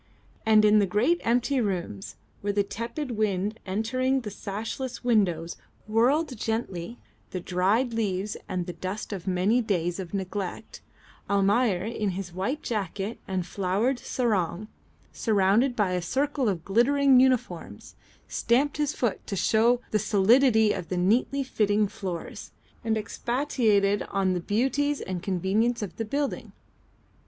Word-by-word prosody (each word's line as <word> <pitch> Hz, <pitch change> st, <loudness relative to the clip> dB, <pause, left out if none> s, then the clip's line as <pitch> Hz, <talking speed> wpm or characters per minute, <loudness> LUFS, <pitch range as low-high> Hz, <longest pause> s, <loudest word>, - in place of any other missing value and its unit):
And 215 Hz, -1 st, +6 dB
in 210 Hz, 0 st, +6 dB
the 200 Hz, -, +2 dB
great 240 Hz, -, +2 dB
empty 245 Hz, +3 st, +1 dB
rooms 175 Hz, -, -3 dB, 0.3 s
where 205 Hz, -, 0 dB
the 200 Hz, 0 st, +1 dB
tepid 235 Hz, +7 st, -5 dB
wind 210 Hz, -1 st, -1 dB
entering 245 Hz, +7 st, 0 dB
through 210 Hz, -, -5 dB
the -, -, -11 dB
sashless 225 Hz, +5 st, -5 dB
windows 180 Hz, -9 st, +1 dB, 0.3 s
whirled 255 Hz, +7 st, +2 dB
gently 200 Hz, -, -3 dB, 0.3 s
the 185 Hz, -, -4 dB
dried 195 Hz, +8 st, +1 dB
leaves 205 Hz, -2 st, -1 dB
and 180 Hz, -1 st, -2 dB
the 180 Hz, -, -5 dB
dust 195 Hz, +4 st, -5 dB
of 190 Hz, -1 st, -7 dB
many 190 Hz, +6 st, +2 dB
days 175 Hz, -5 st, -1 dB
of 180 Hz, -3 st, -6 dB
neglect, 195 Hz, +2 st, -5 dB, 0.5 s
Almayer 200 Hz, 0 st, +2 dB
in 215 Hz, -2 st, -2 dB
his 185 Hz, -3 st, -6 dB
white 200 Hz, -, -2 dB
jacket 205 Hz, 0 st, -3 dB
and 185 Hz, -2 st, -2 dB
flowered 200 Hz, +8 st, 0 dB
sarong, 215 Hz, -6 st, -1 dB, 0.4 s
surrounded 220 Hz, +4 st, +2 dB
by 205 Hz, -5 st, +1 dB
a 180 Hz, 0 st, 0 dB
circle 270 Hz, -, 0 dB
of 175 Hz, -4 st, -3 dB
glittering 260 Hz, +5 st, +4 dB
uniforms, 250 Hz, -10 st, 0 dB, 0.3 s
stamped 270 Hz, +5 st, +1 dB
his 295 Hz, -1 st, 0 dB
foot 240 Hz, -5 st, -1 dB
to 200 Hz, -, -3 dB
show 225 Hz, +6 st, +3 dB
the 215 Hz, -, +2 dB
solidity 220 Hz, +2 st, +4 dB
of 170 Hz, -, -6 dB
the 180 Hz, -, -2 dB
neatly 235 Hz, +9 st, +2 dB
fitting 210 Hz, -4 st, +1 dB
floors 180 Hz, -4 st, -6 dB, 0.3 s
and 225 Hz, -1 st, +1 dB
expatiated 220 Hz, -3 st, +1 dB
upon 195 Hz, -2 st, 0 dB
the 180 Hz, -, -1 dB
beauties 270 Hz, +10 st, 0 dB
and 185 Hz, -2 st, -4 dB
convenience 205 Hz, +6 st, 0 dB
of 180 Hz, -5 st, -7 dB
the 225 Hz, -, -2 dB
building. 280 Hz, +5 st, -3 dB
210 Hz, 145 wpm, -27 LUFS, 190-240 Hz, 0.5 s, And